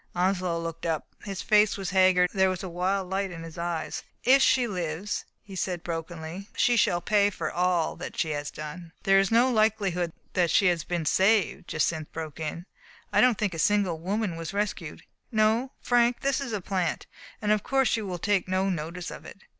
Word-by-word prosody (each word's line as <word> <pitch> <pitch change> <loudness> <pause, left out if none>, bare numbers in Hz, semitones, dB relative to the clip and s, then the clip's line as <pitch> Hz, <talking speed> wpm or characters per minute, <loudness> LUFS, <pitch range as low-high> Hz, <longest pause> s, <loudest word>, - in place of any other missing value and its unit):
Onslow 180 -1 +1
looked 165 0 -5
up. 160 -2 -1 0.2
His 195 -2 -5
face 210 -1 +4
was 195 -2 -4
haggard, 185 -1 +4
and 195 - -6
there 190 0 +5
was 185 -1 -3
a - - -4
wild 185 +2 -1
light 195 +1 -1
in 165 -2 -8
his 165 -1 -9
eyes. 170 -2 -3 0.2
"If 265 +2 +6
she 255 -1 +4
lives," 180 -2 -3 0.2
he 195 -2 -10
said 180 -2 -2
brokenly, 165 +3 -6
"she 245 - +3
shall 175 -6 +2
pay 205 +2 +3
for 205 - -4
all 175 -2 +1
that 175 - -7
she 160 - 0
has 145 0 -3
done 160 +2 -8
" - - -36
"There 195 0 +5
is 195 - +2
no 240 +3 +4
likelihood 205 -6 +1 0.2
that 175 -2 +2
she 200 - +4
has 170 -3 0
been 170 -1 -2
saved," 195 +5 +2
Jacynth 155 0 -1
broke 160 -2 -6
in. 160 +2 -4 0.2
" - - -25
I - - +5
don't 250 -4 +4
think 205 -3 -1
a 165 - -5
single 195 -3 +2
woman 195 0 -2
was 165 +3 -6
rescued. 200 -6 -3 0.3
No, 220 +4 +2
Frank, 240 0 +2
this 275 0 +1
is 270 -4 -4
a 210 -3 -2
plant; 185 -2 -2 0.3
and 210 -1 0
of 215 -1 +3
course 270 +3 +2
you 220 -3 -3
will 180 -1 -3
take 200 +1 +1
no 190 +1 +1
notice 170 +1 -4
of - - -9
it." - - -12
185 Hz, 210 wpm, -27 LUFS, 170-210 Hz, 0.3 s, If